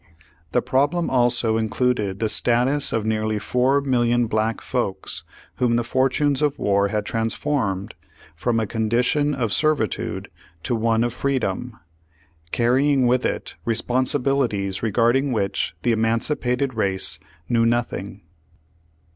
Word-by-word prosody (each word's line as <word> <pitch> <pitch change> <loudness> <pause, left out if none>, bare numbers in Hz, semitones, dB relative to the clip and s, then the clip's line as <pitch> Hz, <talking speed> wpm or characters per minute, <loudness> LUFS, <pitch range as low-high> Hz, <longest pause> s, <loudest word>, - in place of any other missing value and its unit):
The - - +1
problem 145 +7 +1
also 120 -3 +3
in 110 -1 -1
cluded 105 -6 0
the 110 - 0
status 125 +6 +3
of 115 -1 -1
nearly 110 -1 0
four 130 +6 +1
million 120 -3 +1
black 110 0 -1
folks 100 -7 -3 0.3
whom 120 -2 +2
the 120 - +1
fortunes 135 +3 +1
of 150 -2 +1
war 100 0 +2
had 105 0 -2
transformed 115 -3 -1 0.4
from 115 +7 0
a 110 - 0
condition 120 +7 0
of 115 -6 -1
servitude 150 - -1 0.3
to 125 - -1
one 115 0 +1
of 120 -1 -1
freedom, 125 -3 -2 0.7
carrying 130 +3 +2
with 125 +1 +2
it - - -5
responsibilities 125 -4 0
regarding 120 +5 +2
which 100 -4 -1
the 120 - +2
emancipated 125 +4 0
race 95 -4 -1 0.3
knew 115 -1 +2
nothing. 115 -4 -2
120 Hz, 125 wpm, -22 LUFS, 110-130 Hz, 0.7 s, also